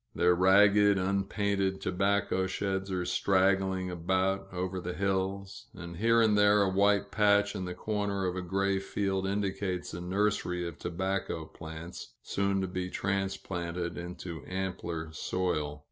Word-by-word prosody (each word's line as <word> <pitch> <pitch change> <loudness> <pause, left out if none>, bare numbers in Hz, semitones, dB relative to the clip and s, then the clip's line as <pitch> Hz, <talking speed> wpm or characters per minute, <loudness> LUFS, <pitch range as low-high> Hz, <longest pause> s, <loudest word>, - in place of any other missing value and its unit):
Their 90 0 +4
ragged, 100 +2 +5
unpainted 100 0 0
tobacco 100 0 +1
sheds 95 0 -2
are 90 -2 -1
straggling 95 -1 +2
about, 95 +3 0
over 90 0 -3
the 90 0 -4
hills; 95 0 -2
and 85 -1 -8
here 115 +3 +4
and 110 -2 +4
there 105 0 +5
a 95 - +2
white 100 +1 +2
patch 100 0 +3
in 95 -2 -3
the 90 0 -5
corner 100 -1 -2
of 90 0 -1
a 95 - -2
gray 95 +2 0
field 95 -1 -1
indicates 95 -2 -2
a 85 - -5
nursery 90 -2 0
of 85 -1 -8
tobacco 90 -2 -2
plants, 80 -5 -9
soon 100 0 0
to 95 - -1
be 90 0 -3
transplanted 90 -3 -2
into 85 -3 -7
ampler 90 -4 -4
soil. 75 -4 -2
95 Hz, 145 wpm, -30 LUFS, 90-100 Hz, -, ragged